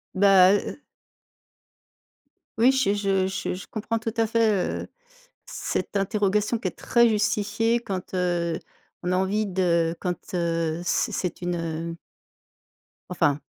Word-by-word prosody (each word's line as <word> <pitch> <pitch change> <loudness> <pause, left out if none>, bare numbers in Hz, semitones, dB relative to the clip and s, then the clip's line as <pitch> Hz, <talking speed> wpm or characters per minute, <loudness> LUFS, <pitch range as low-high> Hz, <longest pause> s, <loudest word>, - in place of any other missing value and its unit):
Ben, 195 0 +6
heu 205 - -1
heu - - -5 1.8
oui, 240 +4 +6
je 265 -7 +2
je 195 -2 +1
je 190 - -3
je 185 - -8
comprends 225 +1 -3
tout 225 0 -4
à 225 - +2
fait, 215 -4 +1
heu, - - -10 0.6
cette - - -3
interrogation 210 +2 +1
qui 185 - -1
est - - -12
très 235 -1 +3
justifiée 215 +2 +1
quand, 190 -5 -5
heu, 175 -2 0 0.5
on 180 - -1
a 185 - +2
envie 200 +3 +1
de 170 -3 +1
quand, 180 -2 -1 0.2
heu, 170 -1 -1
c'est - - +1
c'est 180 -1 -3
une, 175 0 -1 0.4
heu - - -7 1.1
enfin, 145 -5 +1
195 Hz, 140 wpm, -25 LUFS, 180-215 Hz, 1.8 s, Ben